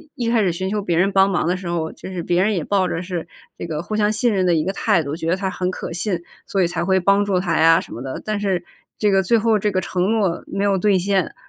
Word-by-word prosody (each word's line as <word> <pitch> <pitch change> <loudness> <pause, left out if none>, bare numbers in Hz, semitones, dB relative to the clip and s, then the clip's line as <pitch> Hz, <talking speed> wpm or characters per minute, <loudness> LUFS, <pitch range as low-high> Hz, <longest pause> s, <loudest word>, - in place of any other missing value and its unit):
一 240 -5 -2
开 230 -1 +3
始 190 -4 +2
寻 185 +3 -3
求 210 +1 -1
别 175 -4 -1
人 190 +3 +3
帮 195 0 +4
忙 180 -4 0
的 180 - +1
时 185 -1 -7
候， 165 -2 -2
就 190 - -10
是 180 -2 -4
别 175 +2 +1
人 210 +3 +2
也 170 - -1
抱 195 0 +1
着 165 - -3
是 175 -2 -5 0.3
这 - - -5
个 155 -2 -3
互 215 - -4
相 210 0 +2
信 225 +2 +1
任 190 -2 +1
的 175 - +3
一 155 - +1
个 190 +4 -2
态 170 -3 +1
度， 140 +1 -4
觉 165 0 -3
得 175 - +3
他 190 0 -2
很 180 0 -2
可 185 - -5
信， 175 0 -2 0.2
所 195 - 0
以 - - +2
才 170 0 -2
会 190 +1 +2
帮 200 +2 +3
助 195 -3 +1
他 175 -3 0
呀 165 +1 +6
什 - - -9
么 120 - -7
的。 130 0 -5
但 215 -1 -1
是 190 -3 -1 0.3
这 210 -1 +2
个 195 0 +4
最 210 +5 +2
后 220 -1 +2
这 210 +1 0
个 185 - 0
承 180 -1 -2
诺 200 -6 0
没 195 - -2
有 200 -1 +2
兑 200 0 +3
现， 190 -1 0
190 Hz, 325 characters per minute, -21 LUFS, 175-200 Hz, 0.3 s, 呀